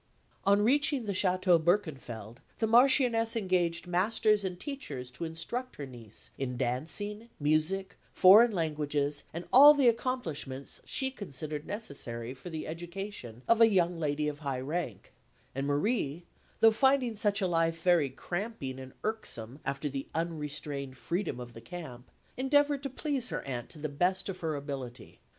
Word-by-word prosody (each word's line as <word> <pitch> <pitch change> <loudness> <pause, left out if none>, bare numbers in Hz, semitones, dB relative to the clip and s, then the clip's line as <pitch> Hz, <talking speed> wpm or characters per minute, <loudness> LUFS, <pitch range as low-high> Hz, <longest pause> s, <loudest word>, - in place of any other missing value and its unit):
On 200 +1 +4
reaching 280 +1 +2
the 205 - -1
Château 185 -3 +3
Berkenfeld, 130 - -1 0.2
the 225 - +1
Marchioness 235 -1 +4
engaged 180 -5 0
masters 210 +4 +2
and 180 -2 -4
teachers 145 - -6
to 165 +7 -5
instruct 170 +11 -5
her 145 - -6
niece 120 -5 -8
in 125 -2 -3
dancing, 170 - -2
music, 155 +6 +1
foreign 215 +6 +8
languages, 150 -4 -1
and 170 +2 -6
all 290 +3 +10
the 275 -3 +4
accomplishments 170 - -2
she 265 0 -1
considered 155 - -6
necessary 130 - -5
for 135 +7 -10
the 160 -2 -5
education 170 - -7
of 230 0 +4
a 225 - +8
young 175 -4 +2
lady 150 -1 0
of 145 -1 -4
high 140 -4 -3
rank; 140 - -4 0.4
and 135 +1 -2
Marie, 150 - 0 0.4
though 225 - +8
finding 255 0 +3
such 205 -1 +1
a 195 - +1
life 165 -2 0
very 175 -6 +4
cramping 175 - -5
and 130 0 -10
irksome 140 - -2
after 140 +2 -2
the 135 -1 -4
unrestrained 150 -4 -3
freedom 170 -4 -2
of 120 -1 -8
the 115 - -10
camp, 125 -3 -9 0.3
endeavoured 285 +2 +3
to 275 - -4
please 270 -2 -2
her - - -3
aunt 125 -3 -5
to - - -11
the 155 +1 -3
best 180 +6 0
of 185 - -5
her 160 -2 -2
ability. 135 -4 -7
170 Hz, 155 wpm, -30 LUFS, 140-215 Hz, 0.4 s, all